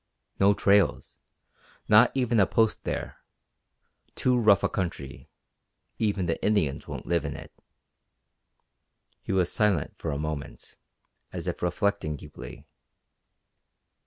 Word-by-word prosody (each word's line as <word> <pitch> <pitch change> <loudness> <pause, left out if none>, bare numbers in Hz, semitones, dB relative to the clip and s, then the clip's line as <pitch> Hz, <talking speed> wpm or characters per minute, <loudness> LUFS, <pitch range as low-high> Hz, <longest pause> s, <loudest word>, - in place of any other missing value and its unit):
No 100 +1 +5
trails. 100 -2 +2 0.7
Not 110 +3 +7
even 125 -4 +1
a 95 - +5
Post 110 -1 +1
there. - - -4 1.0
Too 125 -1 +2
rough 105 -5 +4
a - - +4
country. 80 -7 -5 0.7
Even 100 -4 0
the 80 - -2
Indians 90 -10 0
won't - - -7
live 85 -2 0
in 70 -1 -4
it." 80 -1 -10 1.7
He - - -5
was 90 -2 +1
silent 105 -8 +1
for 80 - -4
a 70 - -2
moment, 75 -1 -6 0.6
as - - -6
if - - -3
reflecting 90 -2 -1
deeply. 65 -3 -11
95 Hz, 120 wpm, -27 LUFS, 80-105 Hz, 1.7 s, Not